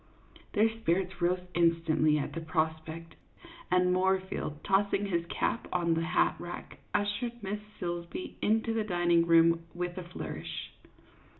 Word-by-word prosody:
Their 215 Hz, +1 st, +5 dB
spirits 185 Hz, -1 st, 0 dB
rose 180 Hz, +1 st, +2 dB
instantly 165 Hz, -2 st, +3 dB
at 145 Hz, -, -3 dB
the 165 Hz, -, -4 dB
prospect, 160 Hz, 0 st, -2 dB, 0.6 s
and 180 Hz, 0 st, +3 dB
Moorfield, 190 Hz, -4 st, 0 dB
tossing 200 Hz, +1 st, +2 dB
his 170 Hz, -3 st, -1 dB
cap 230 Hz, -, -1 dB
on 170 Hz, -2 st, +2 dB
to 165 Hz, -, +1 dB
the 165 Hz, -, -2 dB
hat 180 Hz, -, +2 dB
rack, 175 Hz, 0 st, -8 dB
ush 205 Hz, 0 st, 0 dB
ered 240 Hz, -2 st, -5 dB
Miss 205 Hz, +2 st, -2 dB, 0.2 s
Silsbee 175 Hz, 0 st, -4 dB
into 225 Hz, +1 st, +2 dB
the 225 Hz, -1 st, +1 dB
dining 175 Hz, -4 st, +2 dB
room 165 Hz, 0 st, +5 dB
with 175 Hz, +1 st, -3 dB
a -, -, -6 dB
flourish. 175 Hz, +1 st, -6 dB
175 Hz, 145 wpm, -30 LUFS, 165-195 Hz, 0.6 s, Their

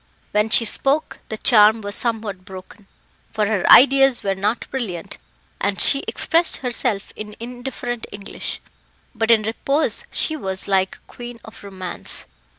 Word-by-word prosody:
When 210 Hz, +1 st, +1 dB
she 230 Hz, -, +4 dB
spoke 275 Hz, +7 st, -1 dB
the 220 Hz, -, -5 dB
charm 220 Hz, -1 st, +5 dB
was 205 Hz, 0 st, -5 dB
somewhat 215 Hz, -5 st, -3 dB
broken, 190 Hz, +2 st, -13 dB, 0.4 s
for 215 Hz, -1 st, 0 dB
her 205 Hz, -3 st, +1 dB
ideas 270 Hz, -1 st, +6 dB
were 195 Hz, -, 0 dB
not 205 Hz, +4 st, -2 dB
brilliant, 200 Hz, -8 st, -5 dB, 0.4 s
and 200 Hz, 0 st, -2 dB
she 275 Hz, -, +5 dB
expressed 335 Hz, +1 st, +1 dB
herself 240 Hz, -5 st, -3 dB
in 210 Hz, 0 st, -8 dB
indifferent 245 Hz, 0 st, -6 dB
English; 200 Hz, -1 st, -7 dB, 0.5 s
but 225 Hz, -1 st, -2 dB
in 225 Hz, -2 st, +5 dB
repose 275 Hz, +7 st, -1 dB
she 315 Hz, -, +3 dB
was 190 Hz, -9 st, -2 dB
like 190 Hz, -1 st, +1 dB
a -, -, -21 dB
queen 240 Hz, -1 st, -10 dB
of 220 Hz, -1 st, -14 dB
romance. 185 Hz, -2 st, -4 dB
220 Hz, 150 wpm, -20 LUFS, 200-245 Hz, 0.5 s, ideas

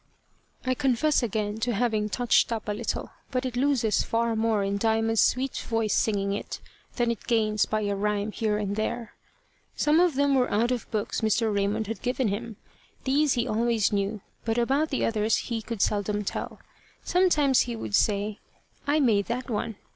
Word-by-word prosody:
I 255 Hz, -, +2 dB
confess 275 Hz, +2 st, +2 dB
again 215 Hz, -2 st, -2 dB
to 235 Hz, 0 st, 0 dB
having 215 Hz, -2 st, 0 dB
touched 245 Hz, +1 st, +2 dB
up 225 Hz, -2 st, -3 dB
a -, -, 0 dB
little, 225 Hz, +2 st, -3 dB, 0.2 s
but 255 Hz, -1 st, -2 dB
it 250 Hz, -2 st, -3 dB
loses 250 Hz, -4 st, +2 dB
far 230 Hz, 0 st, 0 dB
more 220 Hz, -2 st, +1 dB
in 200 Hz, +1 st, -1 dB
Diamond's 225 Hz, 0 st, +2 dB
sweet 260 Hz, +1 st, +1 dB
voice 225 Hz, -2 st, -1 dB
singing 200 Hz, -2 st, +1 dB
it 205 Hz, -, -5 dB, 0.4 s
than 240 Hz, -1 st, +1 dB
it 230 Hz, -, -7 dB
gains 215 Hz, -3 st, +2 dB
by 215 Hz, 0 st, -1 dB
a 205 Hz, -1 st, -1 dB
rhyme 210 Hz, +1 st, -1 dB
here 210 Hz, -1 st, -1 dB
and 205 Hz, -1 st, -2 dB
there. 220 Hz, +1 st, -3 dB, 0.6 s
Some 300 Hz, +2 st, +3 dB
of 350 Hz, -5 st, +3 dB
them 280 Hz, 0 st, +2 dB
were 255 Hz, -2 st, +2 dB
out 230 Hz, +4 st, +1 dB
of 245 Hz, -2 st, -3 dB
books 210 Hz, -2 st, -2 dB
Mr. 220 Hz, 0 st, +1 dB
Raymond 205 Hz, +2 st, 0 dB
had 225 Hz, +2 st, -5 dB
given 250 Hz, -2 st, 0 dB
him. 220 Hz, +3 st, -4 dB, 0.5 s
These 280 Hz, +2 st, +2 dB
he 240 Hz, -, 0 dB
always 225 Hz, -1 st, +1 dB
knew, 200 Hz, +1 st, -1 dB, 0.2 s
but 225 Hz, 0 st, -1 dB
about 275 Hz, +6 st, +1 dB
the 270 Hz, -, 0 dB
others 220 Hz, -1 st, +1 dB
he 230 Hz, -2 st, -3 dB
could 220 Hz, -1 st, -2 dB
seldom 210 Hz, 0 st, 0 dB
tell. -, -, -5 dB, 0.5 s
Sometimes 300 Hz, -8 st, +3 dB
he 240 Hz, -1 st, 0 dB
would 220 Hz, -, -6 dB
say, 205 Hz, 0 st, +1 dB, 0.5 s
"I 295 Hz, +2 st, +3 dB
made 215 Hz, -8 st, +2 dB
that 245 Hz, +2 st, -3 dB
one." 215 Hz, 0 st, -2 dB
225 Hz, 185 wpm, -26 LUFS, 210-250 Hz, 0.6 s, Some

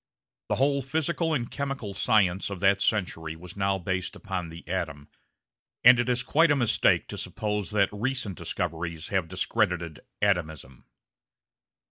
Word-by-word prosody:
The -, -, +2 dB
whole 140 Hz, +1 st, +2 dB
physical 160 Hz, +4 st, -1 dB
and 120 Hz, -6 st, -1 dB
chemical 135 Hz, -8 st, -4 dB
science 95 Hz, -2 st, +2 dB
of 100 Hz, -2 st, -5 dB
that 100 Hz, +1 st, +3 dB
century 80 Hz, -6 st, -1 dB
was 90 Hz, +2 st, -11 dB
now 100 Hz, -1 st, +1 dB
based 95 Hz, 0 st, -3 dB
upon 90 Hz, -3 st, -4 dB
the 80 Hz, 0 st, -11 dB
atom, 75 Hz, -5 st, -4 dB, 0.7 s
and 125 Hz, 0 st, +9 dB
it 120 Hz, -, +1 dB
is 125 Hz, 0 st, +1 dB
quite 165 Hz, +2 st, +4 dB
a 145 Hz, -, +4 dB
mistake 120 Hz, -5 st, +2 dB
to -, -, -5 dB
suppose 105 Hz, -2 st, -3 dB
that 100 Hz, -2 st, +2 dB
recent 120 Hz, -2 st, -2 dB
discoveries 80 Hz, -1 st, -4 dB
have 95 Hz, -4 st, 0 dB
discredited 90 Hz, -3 st, -1 dB, 0.2 s
"atomism." 80 Hz, -10 st, -1 dB
100 Hz, 145 wpm, -27 LUFS, 85-120 Hz, 0.7 s, and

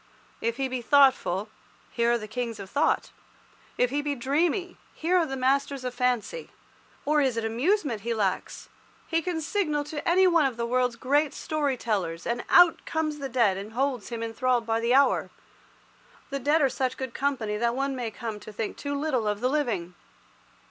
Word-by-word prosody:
If 230 Hz, +1 st, -1 dB
he 270 Hz, -1 st, 0 dB
be 255 Hz, -1 st, -3 dB
thoughtful, 255 Hz, -7 st, +3 dB, 0.4 s
here 235 Hz, 0 st, +1 dB
are -, -, +3 dB
the 215 Hz, -2 st, -7 dB
kings 230 Hz, -1 st, -4 dB
of 195 Hz, -1 st, -9 dB
thought. 290 Hz, +2 st, +1 dB, 0.7 s
If 250 Hz, 0 st, +2 dB
he 290 Hz, +1 st, 0 dB
be 290 Hz, -1 st, -2 dB
dreamy, 325 Hz, -, 0 dB, 0.2 s
here 340 Hz, +3 st, 0 dB
are 330 Hz, -, +1 dB
the 270 Hz, -1 st, -4 dB
masters 270 Hz, +1 st, 0 dB
of 250 Hz, -1 st, -3 dB
fancy. 250 Hz, -, -1 dB, 0.6 s
Or 300 Hz, 0 st, +3 dB
is 260 Hz, -4 st, +1 dB
it 225 Hz, -, -1 dB
amusement 255 Hz, -, 0 dB
that -, -, -18 dB
he 235 Hz, -1 st, 0 dB
lacks? 195 Hz, -4 st, -2 dB, 0.4 s
He 330 Hz, 0 st, 0 dB
can 345 Hz, -2 st, -2 dB
signal 305 Hz, -3 st, 0 dB
to 295 Hz, +2 st, -4 dB
any 375 Hz, +2 st, +5 dB
one 335 Hz, -5 st, +4 dB
of 250 Hz, -3 st, -6 dB
the 235 Hz, -, -1 dB
world's 250 Hz, 0 st, +1 dB
great 285 Hz, +4 st, +1 dB
story 290 Hz, -4 st, -1 dB
tellers, 180 Hz, -8 st, -2 dB
and 240 Hz, +1 st, -2 dB
out 350 Hz, -2 st, +6 dB
comes 310 Hz, -2 st, -2 dB
the 275 Hz, -1 st, -4 dB
dead 230 Hz, -6 st, +2 dB
man 195 Hz, -, -5 dB
and 220 Hz, -, -15 dB
holds 255 Hz, -3 st, -1 dB
him 230 Hz, -1 st, -4 dB
enthralled 240 Hz, +1 st, 0 dB
by 225 Hz, 0 st, 0 dB
the 235 Hz, +2 st, +2 dB
hour. 280 Hz, +1 st, +3 dB, 1.0 s
The 275 Hz, -, -2 dB
dead 295 Hz, +4 st, +2 dB
are -, -, +5 dB
such 260 Hz, -1 st, -2 dB
good 260 Hz, -3 st, -5 dB
company 255 Hz, -7 st, -1 dB
that 235 Hz, +2 st, 0 dB
one 275 Hz, 0 st, -1 dB
may 245 Hz, -3 st, -3 dB
come 220 Hz, -1 st, -6 dB
to 215 Hz, -, -10 dB
think 215 Hz, 0 st, -4 dB
too 285 Hz, 0 st, -3 dB
little 265 Hz, -8 st, 0 dB
of 210 Hz, 0 st, -1 dB
the 250 Hz, +3 st, +1 dB
living. 230 Hz, -, -1 dB
255 Hz, 200 wpm, -27 LUFS, 230-290 Hz, 1.0 s, out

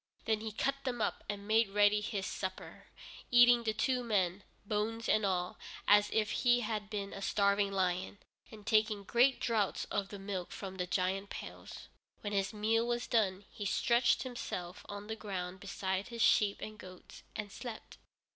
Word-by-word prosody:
Then 220 Hz, -1 st, +1 dB
he 220 Hz, 0 st, -4 dB
cut 275 Hz, +5 st, -1 dB
them 245 Hz, -2 st, -2 dB
up, 215 Hz, -, -1 dB
and 205 Hz, -1 st, -4 dB
made 220 Hz, 0 st, +4 dB
ready 205 Hz, +1 st, +4 dB
his 205 Hz, -2 st, -3 dB
supper, 185 Hz, -2 st, -6 dB, 0.4 s
eating 245 Hz, 0 st, +7 dB
the 225 Hz, -2 st, 0 dB
two 250 Hz, +3 st, 0 dB
men, 195 Hz, -4 st, 0 dB, 0.2 s
bones 220 Hz, +2 st, -1 dB
and 215 Hz, -, +3 dB
all, 180 Hz, -2 st, -1 dB, 0.3 s
as 205 Hz, 0 st, +6 dB
if 215 Hz, -1 st, +1 dB
he 245 Hz, -1 st, +3 dB
had 210 Hz, -2 st, -3 dB
been 200 Hz, -2 st, -4 dB
a 195 Hz, -, -7 dB
starving 200 Hz, 0 st, +2 dB
lion, 185 Hz, 0 st, -1 dB, 0.3 s
and 215 Hz, -2 st, -12 dB
taking 215 Hz, -2 st, +2 dB
great 250 Hz, +6 st, +3 dB
draughts 220 Hz, -4 st, 0 dB
of 200 Hz, -1 st, -1 dB
the 205 Hz, -, -7 dB
milk 195 Hz, -2 st, -5 dB
from 190 Hz, -1 st, -7 dB
the 180 Hz, -1 st, -2 dB
giant 190 Hz, +2 st, 0 dB
pails. -, -, -8 dB, 0.3 s
When 205 Hz, -1 st, -4 dB
his 195 Hz, -1 st, +1 dB
meal 225 Hz, +2 st, +1 dB
was 240 Hz, 0 st, -1 dB
done, 200 Hz, -4 st, +1 dB
he 205 Hz, -, -7 dB
stretched 235 Hz, +4 st, +3 dB
himself 210 Hz, -9 st, -5 dB
on 205 Hz, 0 st, -6 dB
the 220 Hz, +1 st, -4 dB
ground 190 Hz, -4 st, -5 dB
beside 190 Hz, 0 st, -3 dB
his 235 Hz, -2 st, -1 dB
sheep 205 Hz, -2 st, +4 dB
and 215 Hz, 0 st, -7 dB
goats, 185 Hz, -1 st, -12 dB
and 210 Hz, -2 st, -5 dB
slept. 235 Hz, -1 st, -8 dB
210 Hz, 175 wpm, -33 LUFS, 195-225 Hz, 0.4 s, eating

